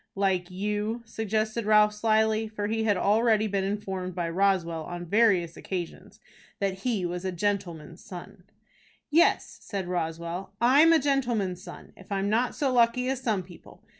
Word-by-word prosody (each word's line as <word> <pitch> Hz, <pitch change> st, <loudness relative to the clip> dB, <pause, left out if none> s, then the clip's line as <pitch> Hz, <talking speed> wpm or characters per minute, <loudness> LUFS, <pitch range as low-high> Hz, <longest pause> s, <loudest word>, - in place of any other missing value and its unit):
"Like 190 Hz, -3 st, 0 dB
you," 210 Hz, +4 st, -3 dB
suggested 220 Hz, 0 st, -2 dB
Ralph, 210 Hz, 0 st, +5 dB
slyly; 220 Hz, 0 st, +1 dB
for 215 Hz, -1 st, -4 dB
he 220 Hz, +1 st, -1 dB
had 205 Hz, -3 st, +2 dB
already 215 Hz, +2 st, +3 dB
been 200 Hz, -2 st, -1 dB
informed 190 Hz, -2 st, -4 dB
by 170 Hz, -2 st, -2 dB
Roswell, 175 Hz, -3 st, +1 dB
on 175 Hz, 0 st, -6 dB
various 185 Hz, -4 st, +2 dB
occasions, 180 Hz, -3 st, -6 dB, 0.4 s
that 195 Hz, -1 st, -2 dB
he 210 Hz, -4 st, -1 dB
was 175 Hz, +1 st, -4 dB
"a 190 Hz, -, -2 dB
gentleman's 175 Hz, -3 st, -3 dB
son." 185 Hz, +1 st, -10 dB, 0.7 s
"Yes," 330 Hz, +3 st, +2 dB
said 195 Hz, -3 st, -5 dB
Roswell, 170 Hz, +1 st, -4 dB
"I'm 280 Hz, +7 st, +6 dB
a 330 Hz, -, +6 dB
gentleman's 240 Hz, -, 0 dB
son, -, -, -11 dB
if -, -, -16 dB
I'm 200 Hz, +1 st, 0 dB
not 235 Hz, +3 st, +1 dB
so 275 Hz, -3 st, 0 dB
lucky 245 Hz, +1 st, +3 dB
as 265 Hz, -1 st, -2 dB
some 215 Hz, -7 st, 0 dB
people. 175 Hz, -1 st, -16 dB
205 Hz, 160 wpm, -27 LUFS, 180-225 Hz, 0.7 s, I'm